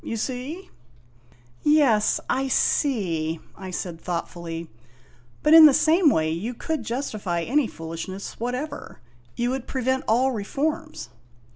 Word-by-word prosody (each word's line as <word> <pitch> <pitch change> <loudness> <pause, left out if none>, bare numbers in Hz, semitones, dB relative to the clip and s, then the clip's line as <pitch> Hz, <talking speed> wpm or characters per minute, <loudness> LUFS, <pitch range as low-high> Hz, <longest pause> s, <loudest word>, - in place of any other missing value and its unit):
You 230 - -4
see? 260 - -5 0.5
' 120 +1 -32 0.3
"Yes, 280 -9 +3
I 270 +1 0
see," 175 - 0 0.2
I 190 -1 -8
said 175 -2 -5
thoughtfully; 170 -1 -5 0.8
"but 300 - +5
in 320 -1 +11
the 280 - +4
same 325 +1 +4
way 160 - +1
you 210 +10 -4
could 320 +6 -3
justify 215 -9 -3
any 275 - +1
foolishness 165 +4 -7
whatever. 250 +6 -5 0.4
You 240 +1 0
would 265 -1 -4
prevent 260 0 -1
all 250 +4 +3
reforms." 290 - -3
240 Hz, 130 wpm, -24 LUFS, 175-280 Hz, 0.8 s, in